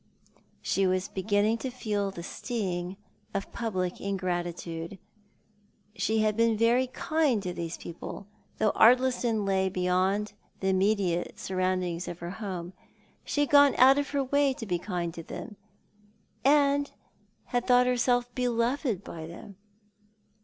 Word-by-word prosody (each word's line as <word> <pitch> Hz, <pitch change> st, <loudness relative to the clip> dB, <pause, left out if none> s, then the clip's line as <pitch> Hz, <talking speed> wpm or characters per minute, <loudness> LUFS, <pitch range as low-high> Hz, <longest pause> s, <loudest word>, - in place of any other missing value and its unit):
She 195 Hz, -1 st, +1 dB
was 185 Hz, +1 st, 0 dB
beginning 205 Hz, +3 st, +1 dB
to 260 Hz, -, -3 dB
feel 210 Hz, -5 st, -2 dB
the 175 Hz, -3 st, -8 dB
sting 185 Hz, -4 st, -3 dB, 0.4 s
of 195 Hz, -, -3 dB
public 185 Hz, -6 st, -3 dB
ingratitude. 175 Hz, -2 st, -3 dB, 1.0 s
She 220 Hz, -1 st, +1 dB
had 215 Hz, -1 st, +2 dB
been 230 Hz, -1 st, +3 dB
very 240 Hz, +3 st, +3 dB
kind 275 Hz, -4 st, 0 dB
to 180 Hz, -2 st, -3 dB
these 170 Hz, -1 st, -5 dB
people 170 Hz, +3 st, -8 dB, 0.2 s
— -, -, -37 dB
though 215 Hz, -, +2 dB
Ardlistou 240 Hz, -2 st, +4 dB
lay 190 Hz, -1 st, +1 dB
beyond 185 Hz, +3 st, 0 dB, 0.3 s
the 190 Hz, -, 0 dB
immediate 190 Hz, -2 st, +1 dB
surroundings 185 Hz, -2 st, -1 dB
of 170 Hz, -, -5 dB
her 175 Hz, 0 st, -6 dB
home. 185 Hz, -4 st, -5 dB, 0.5 s
She 290 Hz, -, -1 dB
had 290 Hz, -, 0 dB
gone 285 Hz, -1 st, +7 dB
out 270 Hz, +2 st, +7 dB
of 285 Hz, -, -2 dB
her 280 Hz, -1 st, 0 dB
way 280 Hz, 0 st, +2 dB
to 225 Hz, -, -6 dB
be 180 Hz, -4 st, -1 dB
kind 175 Hz, -3 st, -3 dB
to 165 Hz, -, -7 dB
them, 210 Hz, +6 st, -8 dB, 0.9 s
and 285 Hz, 0 st, +4 dB, 0.6 s
had 245 Hz, 0 st, -2 dB
thought 250 Hz, -1 st, +5 dB
herself 245 Hz, 0 st, +1 dB
beloved 240 Hz, -, 0 dB
by 160 Hz, -3 st, -7 dB
them. 200 Hz, +4 st, -11 dB
205 Hz, 140 wpm, -28 LUFS, 185-245 Hz, 1.0 s, gone